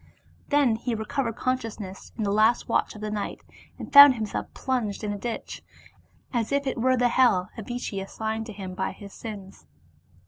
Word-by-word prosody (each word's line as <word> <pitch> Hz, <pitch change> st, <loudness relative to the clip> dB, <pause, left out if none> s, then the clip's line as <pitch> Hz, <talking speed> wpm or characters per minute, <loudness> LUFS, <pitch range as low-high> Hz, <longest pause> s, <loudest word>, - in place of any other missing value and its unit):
Then 280 Hz, -6 st, +3 dB
he 235 Hz, 0 st, -2 dB
recovered 225 Hz, +2 st, -2 dB
consciousness 225 Hz, -7 st, -4 dB
in 220 Hz, -, -2 dB
the 200 Hz, -, 0 dB
last 215 Hz, +3 st, +3 dB
watch -, -, 0 dB
of 210 Hz, -, -10 dB
the 215 Hz, 0 st, -3 dB
night, 210 Hz, -1 st, -4 dB, 0.4 s
and -, -, -9 dB
found 285 Hz, -2 st, +11 dB
him 220 Hz, -2 st, -2 dB
self 210 Hz, -, -5 dB
plunged 235 Hz, -6 st, -2 dB
in 205 Hz, -1 st, -2 dB
a -, -, -4 dB
ditch, 235 Hz, +2 st, -5 dB, 0.7 s
as 235 Hz, -1 st, -1 dB
it 280 Hz, 0 st, +1 dB
were 255 Hz, +2 st, +2 dB
the 245 Hz, 0 st, +3 dB
hell 215 Hz, -7 st, +3 dB
AzHchi 225 Hz, -3 st, -4 dB
assigned 220 Hz, +3 st, -4 dB
to -, -, -7 dB
him 190 Hz, -2 st, -7 dB
by 190 Hz, +1 st, -2 dB
his 200 Hz, -2 st, -12 dB
sins. 200 Hz, -4 st, -9 dB
220 Hz, 180 wpm, -26 LUFS, 205-245 Hz, 0.7 s, found